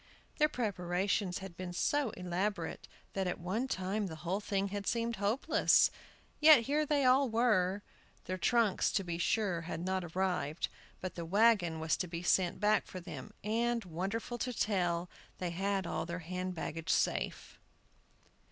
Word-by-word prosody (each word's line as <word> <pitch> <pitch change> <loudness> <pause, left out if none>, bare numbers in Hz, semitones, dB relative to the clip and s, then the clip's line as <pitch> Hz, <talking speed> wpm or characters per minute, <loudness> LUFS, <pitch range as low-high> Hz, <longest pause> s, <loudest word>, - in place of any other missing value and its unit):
Their 300 0 +5
preparations 190 - -1
had 180 -3 -10
been 180 0 -6
so 290 +8 +1
elaborate 180 +3 -2 0.3
that 190 -1 -1
at 180 - -2
one 200 +9 -2
time 195 -1 -1
the 160 - -6
whole 185 +4 0
thing 200 -1 -1
had 200 0 -4
seemed 230 -1 0
hopeless; 205 +6 +3 0.5
yet 305 -4 +8
here 295 +5 0
they 285 -2 +2
all 260 +1 +5
were. 205 -4 +2 0.4
Their 185 0 -3
trunks, 230 -4 +2
to 195 - +1
be 170 -2 -4
sure, 185 -2 +1
had 165 -1 -5
not 190 0 0
arrived; 175 -3 -1 0.3
but 185 - -4
the 170 - -5
wagon 190 -3 +3
was 160 0 +1
to 180 - -2
be 170 0 -5
sent 180 0 +2
back 210 +1 +2
for 185 - -7
them, 185 +4 -8
and, 230 +1 0
wonderful 195 +8 -3
to 250 - -2
tell, 180 -6 0 0.3
they 180 -2 -3
had 195 +2 -1
all - - -3
their 175 +1 -3
hand 185 +1 -3
baggage 165 0 -5
safe. - - 0
190 Hz, 160 wpm, -33 LUFS, 180-225 Hz, 0.5 s, yet